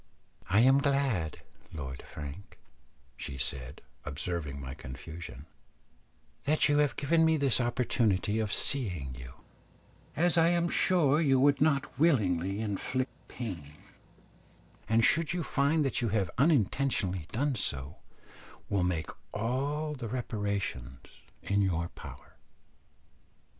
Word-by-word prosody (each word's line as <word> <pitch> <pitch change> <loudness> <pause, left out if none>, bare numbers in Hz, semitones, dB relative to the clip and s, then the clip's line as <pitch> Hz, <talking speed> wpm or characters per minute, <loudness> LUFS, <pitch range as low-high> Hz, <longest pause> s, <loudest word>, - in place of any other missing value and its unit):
"I 100 +4 +5
am 135 +3 +6
glad, 135 - 0 0.3
Lord 65 -4 -6
Frank," 75 +6 -9 0.6
she 65 +2 -6
said, 65 0 -1 0.2
observing 75 0 -4
my 65 -1 -6
confusion, 75 +2 -9 1.0
"that 155 +2 +4
you 145 0 +3
have 145 -3 +2
given 160 +4 +2
me 160 0 +4
this 135 -4 +2
opportunity 115 -4 +1
of 110 -2 -1
seeing 90 - 0
you, 60 -1 -10 0.8
as 170 +2 +3
I 165 - +5
am 170 0 +2
sure 160 -6 +3
you 135 -4 +4
would 140 +1 +4
not 140 -3 +1
willingly 100 - +2
inflict 125 +5 -2 0.2
pain, 85 - -6 1.2
and 115 +1 +4
should 165 +1 +3
you 175 -2 -1
find 145 +2 +2
that 135 - 0
you 115 - 0
have 100 -4 0
unintentionally 125 - +1
done 140 +4 0
so, 70 - -4 0.7
will 100 -2 +1
make 90 -3 -1 0.2
all 140 +7 -1
the 125 -5 -5
reparation 100 - -3 0.5
in 100 0 +1
your 85 -3 0
power." - - -12
110 Hz, 120 wpm, -30 LUFS, 85-140 Hz, 1.2 s, am